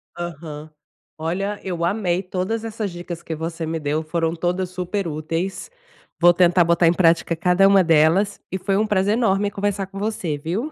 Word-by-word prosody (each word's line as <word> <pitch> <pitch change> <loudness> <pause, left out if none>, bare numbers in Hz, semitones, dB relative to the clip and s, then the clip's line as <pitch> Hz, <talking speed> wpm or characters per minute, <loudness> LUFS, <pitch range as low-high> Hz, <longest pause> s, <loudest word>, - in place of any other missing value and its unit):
Aham. 155 -3 -7 0.5
Olha, 190 +6 -2
eu 175 -3 -3
amei 180 -1 0
todas 190 +4 -3
essas 220 -3 -4
dicas 175 -1 -7
que 160 - -4
você 165 +1 -4
me 160 +1 -3
deu, 150 +1 -1
foram 165 +1 -1
todas 180 +2 -1
super 185 +1 -3
úteis, 165 - -4 0.5
vou 175 0 +7
tentar 175 0 +4
botar 170 +1 +3
em 170 - +5
prática 170 -1 +2
cada 180 +3 +4
uma 195 -1 +5
delas. 165 +5 +3
E 190 - -1
foi 195 +1 0
um 215 - +2
prazer 200 0 +2
enorme 205 -3 +1
conversar 200 -1 -2
com 195 0 -11
você, 190 -8 -2
viu. 195 - -3
180 Hz, 180 wpm, -22 LUFS, 165-195 Hz, 0.5 s, vou